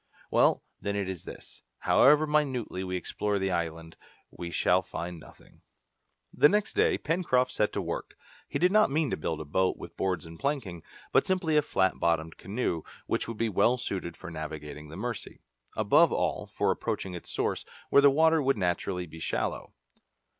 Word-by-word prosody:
"Well, - - +4 0.2
then, 100 0 -2
it 100 -2 -1
is 95 -3 -6
this: - - -11 0.2
however 150 +3 +5
minutely 135 -10 0
we 90 0 -3
explore 100 +3 -2
the 95 -1 -1
island, 80 -1 -3 0.3
we 85 - -6
shall 90 +2 +3
find 85 -1 -6
nothing." - - -17 0.7
The 145 - +6
next 210 +1 +1
day 430 -1 +3
Pencroft 130 -7 +1
set 105 - +1
to 100 - -2
work. 85 - -5 0.3
He - - -1
did 180 +2 +3
not 215 +1 +5
mean 150 +1 0
to - - +1
build 80 0 -3
a 80 - -6
boat 95 +6 +1
with - - -10
boards 95 -2 -1
and 80 0 -11
planking, 120 - -2 0.3
but - - +3
simply 180 -4 +1
a 150 - +6
flat 95 -9 +1
bottomed 80 -1 0
canoe, 100 -5 -2 0.2
which - - -1
would 115 - -5
be 115 - +1
well 115 +4 +3
suited 90 -7 -4
for - - -8
navigating 75 -1 -7
the 80 - -9
Mercy 115 0 -5 0.4
above - - +5
all, - - -1
for - - 0
approaching 95 - -3
its 85 - -8
source, - - -1 0.3
where 140 - +7
the 140 - +8
water 160 +3 +4
would 135 -3 +2
naturally 90 -1 -1
be 80 0 -11
shallow. - - -2
95 Hz, 180 wpm, -29 LUFS, 85-140 Hz, 0.7 s, the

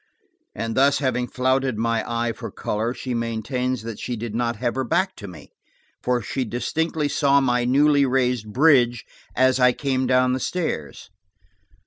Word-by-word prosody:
And 115 0 -3
having 135 -2 +2
thus - - -24
flouted 130 -1 +1
my 115 0 0
eye 115 0 0
for - - -7
color, 110 +3 -2
she 130 0 -5
maintains 115 +2 -2
that 115 -2 -7
she 125 - -4
did 115 -1 -6
not 120 0 -1
have 120 +2 -2
her 130 +3 -2
back 185 +10 0
to 100 - -8
me, 90 - -12 0.5
for 125 -2 0
she 130 +5 -2
distinctly 150 +7 -2
saw 140 -1 +3
my 125 -2 +1
newly 140 +2 +4
raised 125 -4 0
bridge 125 -4 +3 0.3
as 130 0 +3
I 125 -1 +5
came 130 -1 -1
down 125 0 +3
the 130 - -1
stairs. 95 - -4
125 Hz, 165 wpm, -23 LUFS, 115-135 Hz, 0.5 s, I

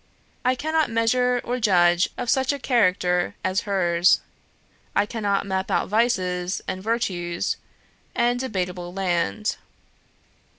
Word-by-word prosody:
I 255 0 +2
cannot 315 +3 0
measure 245 +2 +2
or 250 +1 -2
judge 175 -4 +4
of 245 - -4
such 265 +2 +2
a 285 - -2
character 185 -9 +1
as 185 0 0
hers. 175 -2 +3 0.8
I 200 - +3
cannot 205 -3 -1
map 190 -1 -2
out - - 0
vices, 185 -5 0
and 185 - -3
virtues, 185 -6 -1 0.6
and 240 +1 +2
debatable 180 -7 -3
land. 190 +3 -1
200 Hz, 120 wpm, -24 LUFS, 180-240 Hz, 0.8 s, judge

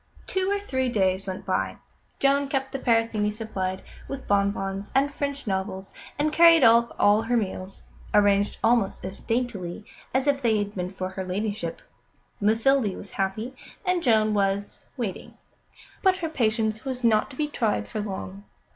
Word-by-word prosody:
Two 380 0 -1
or 405 0 +1
three 260 -10 -1
days 190 -4 +1
went 190 -1 -5
by; - - -1 0.4
Joan 280 +1 +2
kept 270 -1 -2
the 270 - -3
Parisienne 225 -4 +1
supplied 195 -4 -3 0.2
with 275 -1 -6
bonbons 200 0 0
and 280 +2 +3
French 285 -1 -3
novels, 190 -1 -3 0.2
and 300 +1 +1
carried 335 0 +7
up 235 +1 +5
all 205 +1 +5
her 240 +2 +1
meals, 195 -2 -4 0.3
arranged 205 -1 +3
almost 225 -5 +2
as 190 +1 -6
daintily 220 -6 -3 0.3
as 260 +1 +1
if 280 -1 +2
they 225 -4 +3
had 205 0 -2
been 180 -2 -3
for 185 -1 -4
her 190 0 -5
Ladyship. 190 -2 -3 0.6
Mathilde 225 +1 +2
was 200 - -9
happy, 205 +6 -2 0.3
and 365 -1 +1
Joan 220 -6 +3
was 200 0 0 0.2
waiting. 225 -7 -5 0.6
But 380 -1 +4
her 330 -4 -3
patience 220 -5 0
was 255 -2 -4
not 220 -2 +3
to 260 - -11
be 300 +2 -1
tried 215 - -1
for 215 - -4
long. 195 0 -6
220 Hz, 165 wpm, -26 LUFS, 195-265 Hz, 0.6 s, carried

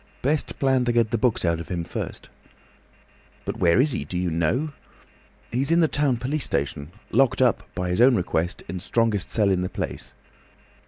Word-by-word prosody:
"Best 145 +3 0
plan 130 -2 +2
to 120 - +2
get 115 -2 +2
the 115 - +1
books 120 -4 +1
out 85 -1 +1
of 85 - -8
him 85 -2 -2
first." - - -6 1.2
"But - - -4
where 85 +5 +3
is 145 +3 +3
he? 70 - -2
Do 80 +5 -5
you 90 -1 -1
know?" 120 - 0 0.8
"He's 135 +4 +1
in 165 +1 +4
the 165 - +4
town 140 -4 +1
police 135 +4 -2
station, 70 +2 -2 0.2
locked 130 +2 +3
up, 125 -3 +3
by 90 -1 -2
his 90 +5 +1
own 125 0 +6
request, 85 -3 -1
in 90 - -5
the - - -7
strongest 110 -3 0
cell 105 -3 +2
in 90 -1 +1
the 90 - -2
place." - - -5
115 Hz, 200 wpm, -24 LUFS, 90-130 Hz, 1.2 s, own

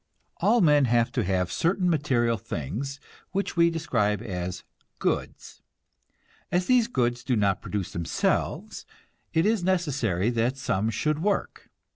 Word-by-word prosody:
All 240 - +3
men 150 -5 +5
have 120 -1 +2
to 125 - 0
have 90 -1 0
certain 180 - +1
material 130 -8 +2
things 125 - -5 0.3
which 200 0 -2
we 170 -1 +5
describe 120 -11 0
as 90 -4 -4 0.3
goods. - - -3 0.9
As 180 +1 +1
these 245 -1 +4
goods 120 - 0
do 130 - 0
not 100 -2 +1
produce 100 -3 -4
themselves, 85 -1 -2 0.4
it 160 - +2
is 215 -3 +2
necessary 140 - +1
that 120 +3 0
some 110 -4 0
should 150 +8 -1
work. 200 +2 -2
125 Hz, 135 wpm, -26 LUFS, 105-170 Hz, 0.9 s, men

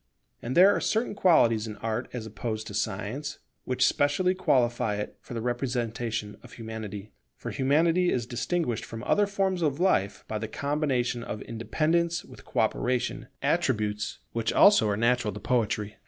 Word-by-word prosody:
And 125 +5 -3
there 190 +3 +7
are - - -1
certain 220 +1 0
qualities 120 - +4
in 105 - -6
Art 115 +3 -3
as 120 -3 -5
opposed 110 0 -4
to - - -8
Science, 110 +10 -3 0.3
which 130 0 +2
specially 145 +6 +2
qualify 120 - +1
it 105 0 -5
for 120 - -9
the 115 - -2
representation 120 -3 -2
of - - -14
Humanity. 110 -2 -7 0.2
For - - -6
Humanity 165 +6 +2
is 120 -3 0
distinguished 120 +2 -2
from 115 +1 -7
other 205 +8 +2
forms 195 -2 0
of 150 -2 0
life 100 - +1
by 110 - -3
the 110 - -4
combination 135 -2 -1
of 105 - -5
independence 160 +9 0
with - - -14
co - - 0
operation, 125 0 -1 0.2
attributes 105 -1 0
which 115 -1 -1
also 200 - +6
are 100 - 0
natural 115 -2 +1
to - - -6
Poetry. 105 -3 -1
120 Hz, 165 wpm, -27 LUFS, 110-150 Hz, 0.3 s, there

